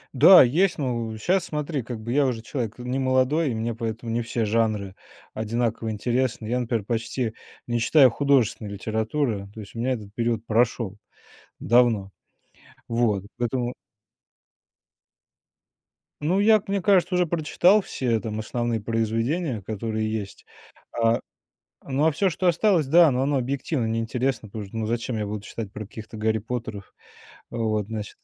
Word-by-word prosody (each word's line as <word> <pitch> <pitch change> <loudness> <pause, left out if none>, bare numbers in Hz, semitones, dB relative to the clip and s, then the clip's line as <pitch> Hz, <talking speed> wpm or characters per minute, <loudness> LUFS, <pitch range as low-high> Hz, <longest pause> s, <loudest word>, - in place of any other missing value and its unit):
Да, 185 +8 +9
есть. 170 +9 +2
Но 120 -5 -2
в 110 - -6
щас, 180 - +1
смотри, 150 -4 -3
как 120 -1 -6
бы 115 +2 -4
я 145 +1 +3
уже 120 -4 -1
человек 115 -1 -4
н 125 0 -6
не 130 +2 0
молодой, 130 +3 +2
и - - -2
мне 115 +1 -2
поэтому 115 0 -4
не 120 - 0
все 115 0 -2
жанры 105 -3 0 0.4
одинаково 115 +1 -2
интересны. 120 +2 -1
Я, 120 +3 0
например, 115 -4 -2
почти 115 +1 -2 0.3
не 120 -1 0
читаю 135 +2 +6
художественной 120 -5 +1
литературы, 110 +1 -2
то 110 - -10
есть 105 0 -10
у - - -5
меня 125 +3 0
этот 105 -5 -5
период 115 -2 -1
прошел. 115 -2 +1 0.6
Давно. 115 -4 +3 0.8
Вот, 115 -5 0
поэтому 120 0 -1 2.5
Ну, 175 +6 +1
я, 215 +1 +6
как 205 0 -16
мне 200 0 0
кажется, 195 -1 +3
уже 180 0 +3
прочитал 170 +5 +3
все 120 - -1
там 110 -1 -4
основные 120 +1 -2
произведения, 115 - -1
которые 110 +2 -3
есть. 105 -3 -5 0.6
А, 115 0 +3 0.7
ну 140 +2 0
а - - +3
всё, 195 +6 +1
что 180 +2 -1
осталось, 175 -3 +3
да, 165 +3 +7
но 125 0 0
оно 140 +1 +1
объективно 135 +1 -1
не 115 0 -1
интересно, 120 0 -2
потому 105 0 -6
что, 100 - -13
ну, 110 -1 -2
зачем 115 +1 -2
я 105 - -2
буду 105 0 -4
читать 105 0 -6
про 110 +1 -7
каких-то 110 +1 -10
Гарри 110 +1 +1
Поттеров? 110 -3 -6 0.6
Вот, 110 -3 -1
значит. 110 -1 -6
115 Hz, 165 wpm, -25 LUFS, 110-135 Hz, 2.5 s, Да